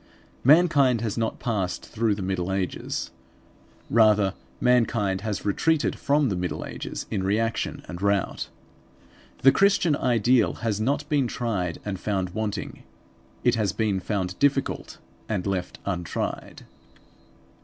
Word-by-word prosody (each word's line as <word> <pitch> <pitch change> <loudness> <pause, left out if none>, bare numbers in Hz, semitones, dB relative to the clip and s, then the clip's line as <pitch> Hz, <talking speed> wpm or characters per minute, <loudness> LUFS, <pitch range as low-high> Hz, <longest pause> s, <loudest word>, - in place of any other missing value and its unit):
Mankind 140 -5 +5
has 110 -3 -2
not 115 -1 -1
passed 105 -7 -2
through 110 -2 0
the 100 - -5
Middle 95 -1 -2
Ages. 95 -1 -3 0.8
Rather 105 -3 +4 0.3
mankind 115 -6 +2
has 105 -1 -3
retreated 155 +10 +1
from 145 -1 +2
the 95 - -1
Middle 90 0 -3
Ages - - -6
in 95 - 0
reaction 110 +4 -1
and 90 +1 -7
rout. 100 -1 0 0.9
The 135 - +8
Christian 195 -5 +3
ideal 120 -2 +3
has 110 -2 0
not 140 +5 0
been 145 -4 +2
tried 100 -9 -2
and 100 -3 -3
found 95 -3 -1
wanting. 105 0 -4 0.6
It 120 - +4
has 105 -5 0
been 105 -4 0
found 95 -1 -3
difficult; 140 -1 0 0.3
and 100 -5 -1
left 95 -2 -2
untried. 90 -4 -4
110 Hz, 130 wpm, -25 LUFS, 95-125 Hz, 0.9 s, The